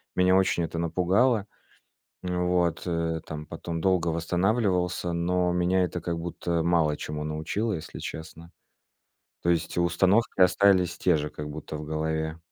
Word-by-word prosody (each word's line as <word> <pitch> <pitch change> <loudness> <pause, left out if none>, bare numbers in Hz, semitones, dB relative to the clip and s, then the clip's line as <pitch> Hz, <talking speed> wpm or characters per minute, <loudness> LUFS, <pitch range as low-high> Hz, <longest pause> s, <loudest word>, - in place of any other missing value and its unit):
Меня 90 0 +4
очень 95 -2 +2
это 85 - -5
напугало. 95 +7 +2 0.8
М, 90 0 -1
вот. 90 -2 +1
Э, 85 -1 -1
там 75 -1 -6
потом 85 +1 -5
долго 90 -1 +2
восстанавливался, 90 +1 0
но 90 +1 +1
меня 90 +1 +2
это 90 0 -3
как 85 0 -3
будто 85 0 -2
мало 80 -3 +2
чему 75 0 -5
научило, 80 +9 -2
если 80 -5 -6
честно. 80 +1 -8 0.9
То 85 - +2
есть 85 -1 0
и 85 - +2
установки 95 +5 +2
остались 90 -1 +4
те 90 -3 +3
же 75 0 -2
как 75 0 -7
будто 75 +1 -7
в 75 - -6
голове. 80 +1 -2
85 Hz, 155 wpm, -27 LUFS, 80-90 Hz, 0.9 s, Меня